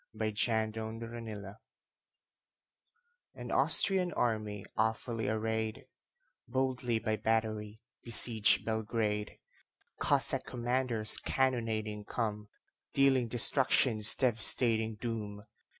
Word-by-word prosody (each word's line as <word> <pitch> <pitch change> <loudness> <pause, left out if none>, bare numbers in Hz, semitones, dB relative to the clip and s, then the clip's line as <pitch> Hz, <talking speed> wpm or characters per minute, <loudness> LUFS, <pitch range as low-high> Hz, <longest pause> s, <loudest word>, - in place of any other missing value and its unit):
Y 110 0 -2
Z - - -8
The 105 - -7
Siege 110 -1 -1
of 110 0 -6
Belgrade 110 -4 -8 1.8
AN - - -8
Austrian 185 -3 +3
army, 105 -4 -2
awfully 110 +1 -2
arrayed, 110 0 -3 0.6
Boldly 130 -3 -2
by 110 -1 -2
battery 110 -1 -2 0.2
besieged 115 -2 +4
Belgrade. 110 -1 -3 0.6
Cossack - - +3
commanders 120 -2 +2
cannonading 110 -5 -2
come, 105 -3 -4 0.5
Dealing 135 -3 +2
destruction's 120 -2 +4
devastating 115 -2 +1
doom. 105 -2 -6
110 Hz, 90 wpm, -31 LUFS, 110-120 Hz, 1.8 s, besieged